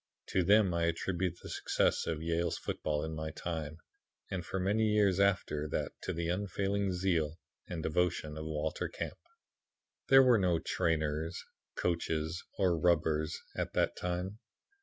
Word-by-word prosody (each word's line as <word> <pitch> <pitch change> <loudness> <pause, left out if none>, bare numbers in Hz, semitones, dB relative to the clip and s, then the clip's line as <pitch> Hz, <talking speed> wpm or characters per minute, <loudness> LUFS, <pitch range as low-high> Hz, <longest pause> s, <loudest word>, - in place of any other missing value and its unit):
To 95 - +2
them 100 0 +5
I 85 0 +1
attribute 85 +1 -1
the - - -7
success - - +1
of 80 -1 -2
Yale's 85 0 0
football 75 -1 -2
in 80 - -4
my 80 0 -3
time, 80 -1 -4 0.5
and 95 -2 -2
for 95 +3 -3
many 105 +4 +2
years 105 -3 +3
after 95 -6 +2
that - - -2
to - - -3
the 85 0 -2
unfailing 100 +2 0
zeal 85 -4 0 0.3
and 85 -3 -4
devotion 80 -2 0
of 80 0 -5
Walter 80 0 -2
Camp. - - -5 0.9
"There 135 0 +8
were 125 -4 +5
no 90 -3 +3
trainers, 80 +1 -1 0.3
coaches, 80 -1 -1
or 90 -4 +2
rubbers 80 -2 +2 0.2
at - - -2
that - - +1
time. 90 +4 -3
85 Hz, 150 wpm, -33 LUFS, 80-95 Hz, 0.9 s, There